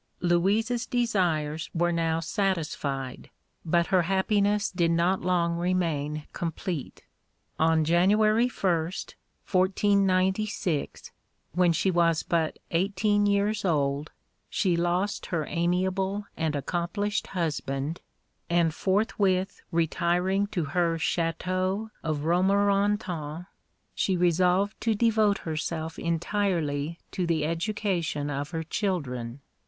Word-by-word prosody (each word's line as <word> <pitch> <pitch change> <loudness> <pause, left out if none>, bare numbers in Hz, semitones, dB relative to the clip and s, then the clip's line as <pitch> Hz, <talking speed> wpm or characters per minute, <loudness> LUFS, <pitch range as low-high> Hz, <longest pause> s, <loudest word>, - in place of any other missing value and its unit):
Louise's 205 +8 +1
desires 170 -10 0
were 175 +1 +2
now 165 -1 0
satisfied, 160 - -2 0.3
but 170 +1 +2
her 185 - +6
happiness 200 +3 +1
did 175 -2 +1
not 170 +3 +2
long 170 -2 +1
remain 160 -5 -1
complete. 170 -3 -4 0.6
On 160 0 +3
January 210 +7 +4
1st, 175 -6 -1 0.4
1496, 190 -2 +1 0.4
when 175 +1 +3
she 180 +4 +1
was 170 -2 +2
but 165 -2 0
eighteen 205 +4 +2
years 205 +1 +1
old, 145 -4 0 0.4
she 185 -4 +1
lost 175 +4 0
her 160 -4 -1
amiable 190 +3 0
and 160 -2 -1
accomplished 175 +8 -2
husband, 150 -2 -2 0.5
and 170 -2 +2
forthwith 190 0 0
retiring 175 +4 +1
to 175 -5 -2
her 165 +3 +1
Château 185 +6 -1
of 155 -2 -2
Romorantin, 190 -3 +1 0.5
she 190 -2 0
resolved 180 +3 +2
to 225 -1 +1
devote 215 -2 +3
herself 160 0 -4
entirely 170 -3 -1
to 180 -2 -2
the 160 -3 +1
education 170 -4 -1
of 145 +1 -3
her 165 -2 -3
children. 140 - -3
175 Hz, 105 wpm, -27 LUFS, 160-195 Hz, 0.6 s, her